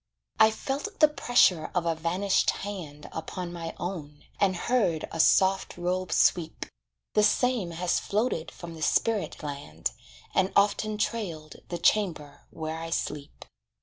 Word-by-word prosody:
I 220 0 +8
felt 280 - -4
the 305 - +8
pressure 245 - +3
of 175 -2 +1
a 165 - +2
vanished 175 +5 +1 0.2
hand 165 -8 -7
Upon 175 +2 -5
my 165 -1 -6
own, 155 -5 -6 0.2
and 190 -2 +3
heard 180 -5 +1
a 165 - -5
soft 190 +3 +3
robe 180 +1 -1
sweep 165 -3 +2 0.5
The 210 - +4
same 230 -2 +2
has 170 +1 0
floated 205 -6 -1
from 170 -1 -9
the 160 - -10
spirit 200 0 0
land, 140 - -4 0.4
And 190 0 +2
often 210 +1 +2
trailed 180 -9 -3
the 175 - -3
chamber 165 -6 0
where 160 0 -5
I 165 0 -5
sleep. 150 -3 -4
175 Hz, 145 wpm, -28 LUFS, 160-210 Hz, 0.5 s, I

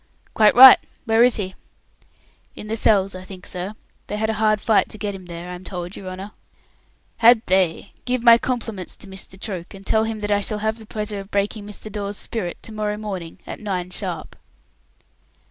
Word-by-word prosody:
"Quite 215 -1 +5
right. 260 +1 +11 0.3
Where 225 0 +4
is 250 0 +5
he?" 190 -3 -2 1.0
"In 210 - -9
the 225 - 0
cells, 200 -3 +3
I 185 0 -8
think, 185 -1 -11
sir. 185 +4 -5 0.3
They 210 - -3
had 220 +1 0
a 220 0 -4
hard 215 -1 +3
fight 215 0 +2
to - - -8
get 205 -1 -3
him 185 -2 -10
there, 170 0 -7
I - - -5
am 180 +1 -9
told, 180 -1 -6
your 185 - -7
honour." 190 +3 -7 0.9
"Had 235 0 +6
they? 185 0 +1
Give 250 -1 -1
my 235 -1 +8
compliments 225 -8 -4
to - - -9
Mr. 190 0 -6
Troke, 190 -3 -6
and 195 0 -13
tell 220 +2 +2
him 220 -1 -4
that 210 0 -2
I 205 0 +3
shall 210 +1 -2
have 220 +2 -2
the 220 - -13
pleasure 210 -1 -4
of 195 0 -9
breaking 205 +1 -2
Mr. 210 +1 -6
Dawes's 200 -1 -4
spirit 195 -7 -4
to - - -6
morrow 210 -1 -2
morning 190 -6 -6
at - - -7
nine 185 -4 -3
sharp." - - -5
205 Hz, 205 wpm, -22 LUFS, 190-220 Hz, 1.0 s, right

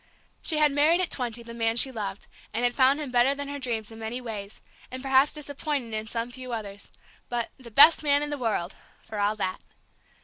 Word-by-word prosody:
She 315 - +2
had 300 -1 +4
married, 300 +5 +3
at 370 - +1
twenty, 240 -2 -3
the 235 0 -10
man 225 -1 0
she 265 +3 +5
loved, 200 -4 -5 0.3
and 235 - -1
had 245 0 +2
found 270 +2 +3
him 290 -4 -5
better 245 +3 +3
than 285 0 -5
her 285 0 -5
dreams 230 -4 -3
in 225 - -11
many 225 +3 -4
ways, 215 -4 -7 0.3
and 255 +1 -7
perhaps 270 +1 +4
disappointing 285 -4 -4
in 215 0 -3
some 230 +1 -3
few 255 0 -8
others, 205 -3 -6 0.4
but 240 -1 -2
"the 245 -2 -11
best 285 +8 +8
man 290 -1 +2
in 295 - -4
the 290 - -2
world" 210 -6 -2 0.3
for 220 -2 -7
all 205 +1 +1
that. 185 -3 -3
245 Hz, 215 wpm, -26 LUFS, 220-280 Hz, 0.4 s, best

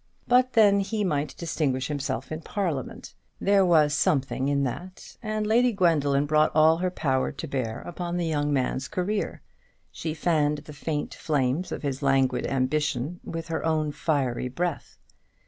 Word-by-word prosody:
But 250 +1 +4
then 205 -3 +5
he 210 +2 -1
might 150 -5 -1
distinguish 140 -6 -1
himself 135 -3 -3
in 155 +1 -4
Parliament. 165 - -4 0.3
There 200 0 +4
was 155 -5 +4
something 135 -2 +1
in 140 -1 +1
that; 180 +9 -6
and 215 -1 -2
Lady 240 +3 +4
Gwendoline 150 -8 +2
brought 155 +1 +3
all 160 +1 +6
her 185 +2 0
power 135 -7 0
to 150 +3 -6
bear 125 -6 -3
upon 175 0 -4
the 175 - -1
young 150 -2 0
man's 130 -1 0
career. 200 +3 -2 0.5
She 160 -1 -4
fanned 150 -2 +1
the 150 - -10
faint 145 +1 -3
flames 145 +2 -1
of - - -5
his 140 -1 -2
languid 135 -2 +2
ambition 145 +3 -1
with 165 0 -6
her 165 - -2
own 155 -2 +1
fiery 140 -5 -1
breath. 170 +6 -3
155 Hz, 160 wpm, -26 LUFS, 140-175 Hz, 0.5 s, all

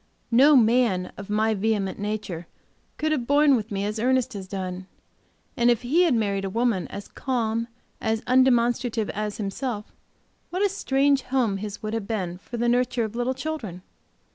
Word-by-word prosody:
No 275 +6 +7
man 225 -6 +3
of 200 0 -9
my 215 +1 +2
vehement 205 -2 -1
nature 205 -5 -4 0.5
could 310 0 0
have 255 -6 -1
borne 285 -1 +5
with 220 -2 -3
me 200 -1 -2
as 215 +1 -3
Ernest 255 +1 +1
has 195 -2 -7
done, 185 -1 -5 0.7
and 240 0 +3
if 240 0 +2
he 295 +9 +3
had 305 -8 +3
married 200 -3 0
a 195 - -2
woman 230 -3 0
as 200 - -8
calm, 230 -3 -2 0.3
as 220 -1 0
undemonstrative 245 -3 +2
as 210 0 -3
himself 210 +1 -4 0.6
what 365 +3 -1
a - - +2
strange 275 -7 +2
home 250 -6 0
his 205 +1 -6
would 215 +1 -3
have 225 -3 -3
been 185 -6 -3
for 240 +4 -8
the 240 +1 0
nurture 245 0 +2
of 220 0 -5
little 245 +2 -1
children? 255 - -5
225 Hz, 175 wpm, -25 LUFS, 205-255 Hz, 0.7 s, No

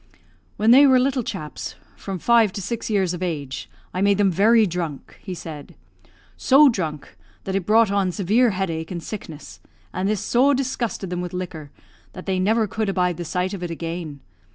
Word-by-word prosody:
"When 220 +2 +4
they 280 +3 +8
were 260 -1 +6
little 260 +1 +1
chaps, 155 -9 -6 0.2
from 195 -1 -6
five 230 +2 +4
to 200 - -5
six 235 +4 -4
years 190 -4 +1
of 175 - -6
age, 145 -7 -4 0.2
I 185 - -2
made 200 0 +3
them 200 -2 +3
very 220 +5 +4
drunk," 170 -6 -5
he 185 -3 -6
said; 155 -4 -9 0.6
"so 280 +2 +6
drunk 160 - -4 0.3
that 190 - -4
it 195 -2 -2
brought 220 -1 +4
on 195 -2 +1
severe 215 +7 +2
headache 170 -5 -3
and 170 -3 -5
sickness, 160 -7 -8 0.3
and 190 +2 -1
this 215 -2 0
so 270 +7 +3
disgusted 245 -7 -3
them 180 0 -2
with 180 0 -6
liquor, 170 -5 -6 0.4
that - - -9
they 190 -1 -1
never 220 +4 +2
could 215 0 -2
abide 180 -3 0
the 175 - -5
sight 180 +4 -2
of 195 - -6
it 175 - -4
again. 165 -3 -5
190 Hz, 190 wpm, -22 LUFS, 175-220 Hz, 0.6 s, they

